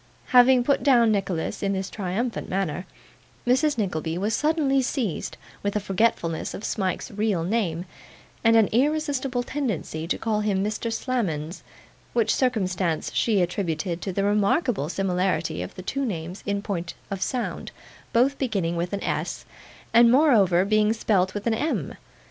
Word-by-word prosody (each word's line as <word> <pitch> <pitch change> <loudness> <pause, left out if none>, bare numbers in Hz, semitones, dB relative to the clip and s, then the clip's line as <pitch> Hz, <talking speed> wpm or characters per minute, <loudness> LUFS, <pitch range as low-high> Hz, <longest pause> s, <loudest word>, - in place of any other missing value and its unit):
Having 250 0 +6
put 280 +3 +2
down 240 -5 +5
Nicholas 190 -5 -2
in 200 -1 0
this 190 0 -2
triumphant 210 +5 -3
manner, 185 -2 -2 0.6
Mrs. 265 +3 +2
Nickleby 165 -5 -2
was 205 +4 -1
suddenly 295 -3 +2
seized 245 - -2 0.2
with 205 0 -2
a - - +2
forgetfulness 195 -5 0
of 205 - -8
Smike's 190 -5 -2
real 205 -4 0
name, 180 -3 -1 0.6
and 225 0 +5
an 225 -2 +6
irresistible 275 -1 0
tendency 215 - -3
to - - 0
call 220 -2 -1
him 200 -2 0
Mr. 215 +2 -2
Slammons; 185 - -2 0.5
which 225 -2 +2
circumstance 185 - 0
she 210 -5 +2
attributed 175 -1 -2
to 195 - -3
the 195 +2 -1
remarkable 205 - +1
similarity 180 - 0
of 90 - -7
the 185 - -8
two 275 +8 -2
names 180 -5 -4
in 200 0 -1
point 175 -4 -4 0.2
of 195 -1 -3
sound 245 +4 -3 0.4
both 265 +4 +2
beginning 195 -10 -1
with 175 +3 -2
an 200 - -2
S, - - -3 0.5
and 235 0 +7
moreover 210 - +5
being 215 +1 +3
spelt 195 -4 +1
with 205 - -4
an 230 - +2
M. 295 +9 -1
205 Hz, 155 wpm, -25 LUFS, 180-240 Hz, 0.6 s, and